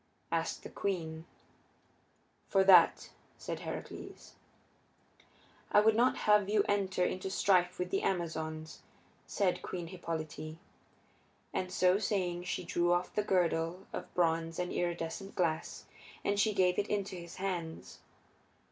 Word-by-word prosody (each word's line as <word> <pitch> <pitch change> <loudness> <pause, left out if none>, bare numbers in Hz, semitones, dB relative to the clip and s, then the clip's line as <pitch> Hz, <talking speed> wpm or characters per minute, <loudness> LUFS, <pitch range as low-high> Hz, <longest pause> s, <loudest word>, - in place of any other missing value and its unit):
asked - - -1
the - - -7
queen. 165 -5 -3 1.2
"For 195 -1 +4
that," 185 -3 +6 0.3
said - - -5
Heracles. - - -8 1.4
"I - - +7
would 215 +1 +4
not 245 +3 +3
have 210 -2 +5
you 210 -1 +3
enter 190 -3 +1
into 185 +1 -2
strife 180 -2 +2
with 180 0 -3
the 195 - +1
Amazons," 160 -3 -3 0.5
said 190 -3 0
Queen 175 -2 -5
Hippolyte. 160 -3 -5 1.0
And 185 0 -2
so 185 +1 +3
saying 180 -5 -1
she 180 - -2
drew 175 0 +1
off 175 +1 +1
the 210 - +1
girdle 180 -1 0
of - - -6
bronze 165 -2 +1
and 180 0 -2
iridescent 175 +3 -3
glass, 165 -3 -1 0.4
and 200 0 +1
she 210 0 +2
gave 180 -1 +3
it 205 - 0
into 200 -2 -2
his 170 -1 -9
hands. 175 -4 -4
180 Hz, 130 wpm, -32 LUFS, 170-195 Hz, 1.4 s, I